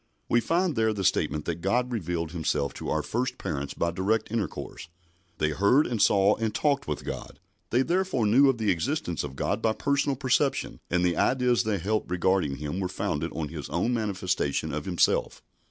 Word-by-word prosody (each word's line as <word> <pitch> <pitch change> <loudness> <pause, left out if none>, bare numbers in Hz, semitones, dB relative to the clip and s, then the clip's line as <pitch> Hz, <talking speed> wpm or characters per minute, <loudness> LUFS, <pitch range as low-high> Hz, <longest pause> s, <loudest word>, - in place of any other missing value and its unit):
We 120 - +3
find 170 +1 +1
there 110 -1 +2
the 100 -2 -3
statement 75 -5 +1
that 85 0 -3
God 125 +7 +1
revealed 85 -7 -2
Himself 75 -4 -1
to - - -6
our 80 - 0
first 125 +3 -2
parents 70 -2 -4
by 85 - 0
direct 100 +6 0
intercourse. 105 -6 -4 0.5
They 75 - +1
heard 100 - +4
and 115 -4 -2
saw 100 +1 +5
and 110 -1 -2
talked 140 -2 +1
with - - -4
God. - - -6 0.3
They 125 +3 +3
therefore 175 - 0
knew 130 +7 +5
of 130 - +1
the 110 -3 +1
existence 90 - -1
of 70 -2 -6
God - - -1
by 110 - +2
personal 140 +2 0
perception, 135 +1 0
and 90 0 +2
the 90 - +1
ideas 125 -2 +2
they 110 -2 0
held 105 +4 -1
regarding 90 -4 +1
Him 75 +5 -4
were 95 - -1
founded 80 -2 -2
on 75 -3 -3
His - - -7
own 125 - 0
manifestation 95 - -1
of 75 0 -3
Himself. 90 -4 +1
100 Hz, 190 wpm, -27 LUFS, 85-125 Hz, 0.5 s, saw